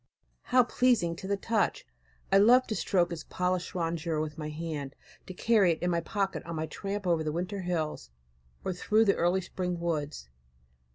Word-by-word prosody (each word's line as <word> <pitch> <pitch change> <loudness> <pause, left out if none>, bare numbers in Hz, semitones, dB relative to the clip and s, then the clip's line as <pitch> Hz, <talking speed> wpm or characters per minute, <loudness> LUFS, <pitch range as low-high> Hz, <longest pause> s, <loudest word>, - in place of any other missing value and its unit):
How 250 0 +5
pleasing 235 -9 +2
to 190 - -7
the 200 0 0
touch! 220 +2 0 0.5
I 195 - +6
love 245 +5 +6
to 215 - -3
stroke 175 -2 +1
its 165 -2 -5
polished 180 0 -2
rondure 165 -2 -1
with 155 -1 -3
my 155 -1 -5
hand, 150 -3 -5 0.3
to 185 - -6
carry 205 -6 +4
it 160 - -8
in 180 - +1
my 170 -1 +1
pocket 195 +2 -2
on 170 0 -6
my 155 0 -2
tramp 200 +4 -5
over 170 -3 +2
the 155 - -1
winter 180 +5 -3
hills, 160 - -3 0.6
or 190 - 0
through 215 +5 +2
the 200 - +4
early 175 +2 +2
spring 180 -1 -3
woods. 150 - -3
175 Hz, 185 wpm, -29 LUFS, 165-200 Hz, 0.6 s, I